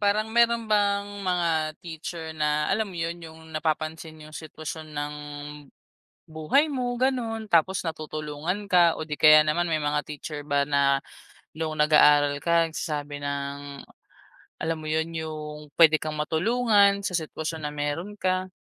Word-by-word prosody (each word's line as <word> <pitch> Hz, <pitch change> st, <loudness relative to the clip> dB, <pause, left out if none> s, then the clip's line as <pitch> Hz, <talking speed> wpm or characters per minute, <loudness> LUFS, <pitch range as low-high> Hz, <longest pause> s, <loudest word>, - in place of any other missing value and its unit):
parang 215 Hz, +2 st, +1 dB
mayro'n 235 Hz, -1 st, +3 dB
bang 205 Hz, -1 st, +2 dB, 0.2 s
mga 180 Hz, -3 st, 0 dB, 0.4 s
teacher 160 Hz, 0 st, -6 dB
na 150 Hz, -1 st, 0 dB
alam 215 Hz, +1 st, 0 dB
mo 180 Hz, -, -9 dB
yun? 170 Hz, +1 st, -3 dB
Yung 160 Hz, 0 st, -12 dB
napapansin, 155 Hz, 0 st, -3 dB
yung 155 Hz, -, -13 dB
sitwasyon 155 Hz, 0 st, -7 dB
ng 145 Hz, 0 st, -3 dB, 1.1 s
buhay 160 Hz, -, +2 dB
mo 255 Hz, -4 st, -2 dB
gano'n, 235 Hz, -4 st, -1 dB
tapos 180 Hz, +1 st, +2 dB
natutulungan 155 Hz, +4 st, -4 dB
ka, 175 Hz, -3 st, +4 dB
o 160 Hz, -, -5 dB
di 150 Hz, -, -3 dB
kaya 155 Hz, 0 st, +7 dB
naman 170 Hz, +3 st, 0 dB
may 155 Hz, -, +1 dB
mga 150 Hz, 0 st, 0 dB
teacher 150 Hz, 0 st, -7 dB
ba 140 Hz, -1 st, 0 dB
na 140 Hz, -1 st, +3 dB, 0.6 s
nung 155 Hz, -1 st, -4 dB
nag-aaral 150 Hz, -1 st, +5 dB
ka 170 Hz, -1 st, +3 dB
nagsasabi 145 Hz, -2 st, -4 dB
ng, 140 Hz, 0 st, -5 dB, 0.8 s
alam 165 Hz, 0 st, -1 dB
mo 155 Hz, -, -10 dB
yun? 160 Hz, +1 st, 0 dB
Yung 150 Hz, -2 st, -7 dB
puwede 160 Hz, -2 st, +7 dB
kang 155 Hz, -1 st, -3 dB
matulungan, 200 Hz, +5 st, +3 dB
sa 180 Hz, -, -2 dB
sitwasyon 160 Hz, -1 st, -5 dB
na 150 Hz, -, -4 dB
mayro'n 150 Hz, +7 st, -3 dB
ka? 185 Hz, -1 st, -1 dB
160 Hz, 150 wpm, -26 LUFS, 150-185 Hz, 1.1 s, kaya